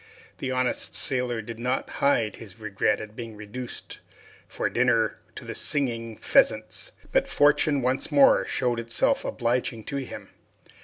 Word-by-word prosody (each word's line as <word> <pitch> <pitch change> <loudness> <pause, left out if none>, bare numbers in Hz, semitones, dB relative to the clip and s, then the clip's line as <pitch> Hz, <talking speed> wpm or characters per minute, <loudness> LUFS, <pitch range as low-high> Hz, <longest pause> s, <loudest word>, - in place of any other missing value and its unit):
The 130 - -3
honest 130 -1 -1
sailor 125 -4 -1
did 115 +1 -8
not 125 +2 -1
hide 115 -7 +2
his 105 -2 -11
regret 105 -1 0
at 110 0 -9
being 115 -2 -7
reduced 105 +4 -7 0.5
for - - -2
dinner - - +2 0.2
to - - -8
the - - -5
singing 115 -5 -1
pheasants, - - +2 0.2
but - - +2
fortune 145 -1 +3
once 130 +5 0
more 140 -2 +6
showed 120 -2 0
itself 115 - +1
obliging 120 -2 -1
to 140 - -4
him. 135 -2 -7
120 Hz, 145 wpm, -26 LUFS, 110-130 Hz, 0.5 s, more